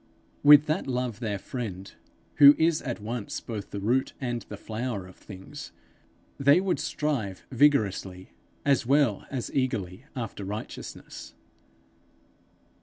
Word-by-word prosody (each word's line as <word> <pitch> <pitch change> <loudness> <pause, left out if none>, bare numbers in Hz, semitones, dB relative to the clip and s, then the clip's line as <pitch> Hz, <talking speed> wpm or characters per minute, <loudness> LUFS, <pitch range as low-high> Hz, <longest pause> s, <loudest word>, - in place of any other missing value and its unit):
With 145 0 +8
that 155 -1 -1
Love 125 -3 -2
their 110 -4 -2
friend, 100 -3 -6 0.4
who 145 0 +10
is 160 -1 +2
at 120 -4 -4
once 110 +1 -4
both 105 -4 -6
the 100 - -5
root 120 +6 +1
and 120 -3 -2
the 105 - -6
flower 110 -2 -4
of 90 - -14
things, 95 -2 -10 0.7
they 140 +4 +6
would 190 -1 0
strive 150 - -2
vigorously 105 -9 +1 0.3
as 140 -1 +3
well 135 -4 +2
as 130 -4 -4
hunger - - 0
eagerly 115 -4 -3
after 115 -5 -5
righteousness. 105 +3 -7
120 Hz, 130 wpm, -27 LUFS, 100-140 Hz, 0.7 s, who